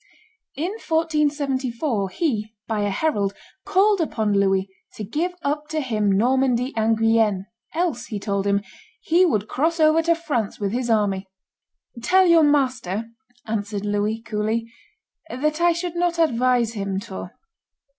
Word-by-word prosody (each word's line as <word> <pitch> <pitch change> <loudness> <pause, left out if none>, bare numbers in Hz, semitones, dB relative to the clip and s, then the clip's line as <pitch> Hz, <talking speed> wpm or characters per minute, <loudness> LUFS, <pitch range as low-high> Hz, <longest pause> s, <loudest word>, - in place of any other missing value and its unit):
In 330 +7 -2
1474 285 - 0
he, 220 - -2
by 220 -2 -1
a 205 - 0
herald, 200 -4 0 0.3
called 400 0 +3
upon 220 -9 0
Louis 195 -1 +2 0.3
to 215 - -6
give 325 - -2
up 295 +1 -1
to 310 0 -2
him 215 -7 0
Normandy 250 +4 +2
and 225 0 +2
Guienne, 225 -4 +2 0.3
else, 320 -9 -1
he 210 - -4
told 200 0 -1
him, 200 0 +1 0.4
he 360 -2 +3
would 215 - 0
cross 325 +8 0
over 310 +1 +5
to 335 +1 +2
France 270 -11 -2
with 200 -2 -1
his 240 +1 -2
army. 200 -3 +1 0.7
"Tell 375 +8 +4
your 335 -2 +6
master," 250 - +1 0.3
answered 205 -2 -3
Louis 205 +2 0
coolly, 225 +1 -2 0.6
"that 305 +5 -1
I 345 0 +5
should 340 0 -3
not 345 0 0
advise 250 -6 +2
him 195 -3 -2
to." 190 -2 -7
240 Hz, 145 wpm, -23 LUFS, 210-315 Hz, 0.7 s, your